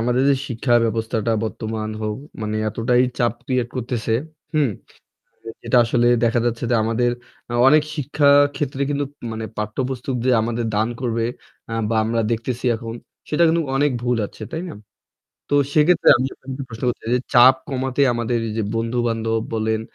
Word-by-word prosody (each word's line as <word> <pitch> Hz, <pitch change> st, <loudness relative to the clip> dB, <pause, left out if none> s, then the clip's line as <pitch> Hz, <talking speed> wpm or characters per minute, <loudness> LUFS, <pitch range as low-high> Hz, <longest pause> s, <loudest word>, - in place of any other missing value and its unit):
আমাদের 120 Hz, +2 st, +1 dB
যে 140 Hz, -, +3 dB
শিক্ষা 120 Hz, 0 st, -1 dB
ব্যবস্থাটা 115 Hz, 0 st, -1 dB
বর্তমান 110 Hz, -1 st, -4 dB
হোক, 105 Hz, 0 st, -2 dB, 0.3 s
মানে 105 Hz, 0 st, -2 dB
এতটাই 120 Hz, +3 st, +2 dB, 0.2 s
চাপ 120 Hz, -2 st, +2 dB
ক্রিয়েট 125 Hz, -2 st, 0 dB
করতেছে, 120 Hz, -2 st, -2 dB, 0.4 s
হুম? 150 Hz, -4 st, +3 dB, 0.9 s
যেটা -, -, +1 dB
আসলে 120 Hz, +1 st, +1 dB, 0.2 s
দেখা 115 Hz, +1 st, +2 dB
যাচ্ছে 120 Hz, 0 st, -2 dB
যে 120 Hz, -, +3 dB
আমাদের 120 Hz, +2 st, +1 dB, 0.4 s
আ -, -, -3 dB
অনেক 150 Hz, +1 st, +5 dB
শিক্ষা 145 Hz, +1 st, +1 dB, 0.3 s
ক্ষেত্রে 140 Hz, -1 st, -2 dB
কিন্তু 145 Hz, 0 st, 0 dB, 0.3 s
মানে 110 Hz, 0 st, -4 dB
পাঠ্যপুস্তক 125 Hz, +4 st, -3 dB
যে 130 Hz, -, +3 dB
আমাদের 115 Hz, +1 st, -2 dB
দান 110 Hz, +2 st, +1 dB
করবে 115 Hz, -2 st, -1 dB, 0.5 s
আ -, -, -5 dB, 0.2 s
বা 115 Hz, -, +1 dB
আমরা 115 Hz, +1 st, 0 dB
দেখতেছি 120 Hz, +2 st, -3 dB
এখন 115 Hz, 0 st, -7 dB, 0.4 s
সেটা 155 Hz, +3 st, +2 dB
কিন্তু 165 Hz, +1 st, +2 dB
অনেক 145 Hz, +1 st, +3 dB
ভুল 125 Hz, 0 st, +1 dB
আছে, -, -, -13 dB
তাই 165 Hz, +2 st, -3 dB
না? -, -, -7 dB, 0.7 s
তো -, -, 0 dB, 0.2 s
সেক্ষেত্রে 160 Hz, +3 st, +4 dB
আমি 130 Hz, +2 st, -1 dB
আপনাকে 135 Hz, +1 st, -7 dB
প্রশ্ন 115 Hz, -1 st, -10 dB
করতে 120 Hz, -, -2 dB
চাই 115 Hz, -, -2 dB
যে -, -, -1 dB
চাপ 125 Hz, +2 st, +8 dB
কমাতে 130 Hz, 0 st, -2 dB
আমাদের 120 Hz, 0 st, -1 dB
এইযে 110 Hz, +1 st, -2 dB
বন্ধু-বান্ধব 115 Hz, -1 st, 0 dB
বলেন 110 Hz, 0 st, 0 dB
120 Hz, 165 wpm, -21 LUFS, 115-130 Hz, 0.9 s, চাপ